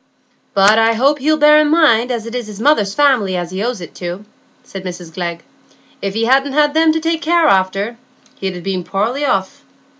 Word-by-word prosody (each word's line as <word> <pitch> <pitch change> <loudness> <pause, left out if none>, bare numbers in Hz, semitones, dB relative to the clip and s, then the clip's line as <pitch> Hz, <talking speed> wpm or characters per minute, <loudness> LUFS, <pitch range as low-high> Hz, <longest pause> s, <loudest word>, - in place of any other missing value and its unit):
"But 200 +3 +5
I 225 0 +3
hope 275 +6 +1
he'll 310 +3 +1
bear 300 0 +6
in 305 -1 +2
mind 280 -7 +3
as 235 -3 -3
it's 235 -1 -5
his 210 -1 -10
mother's 220 -7 +1
family 250 -11 +2
as 175 0 -5
he 190 +1 -4
owes 240 -4 -3
it 170 - -10
to," 180 +4 -6 0.4
said 195 -1 -9
Mrs 175 -2 -8
Glegg. 170 -1 -5 0.6
"If 195 0 -4
he 225 +1 0
hadn't 270 +3 +2
had 295 0 +2
them 320 0 +3
to 320 - -1
take 325 0 -3
after, 205 - +1 0.4
he'd 190 -2 -4
ha' - - -13
been 190 -2 -3
poorly 230 +11 -2
off. 195 -7 -2
225 Hz, 200 wpm, -16 LUFS, 195-290 Hz, 0.6 s, bear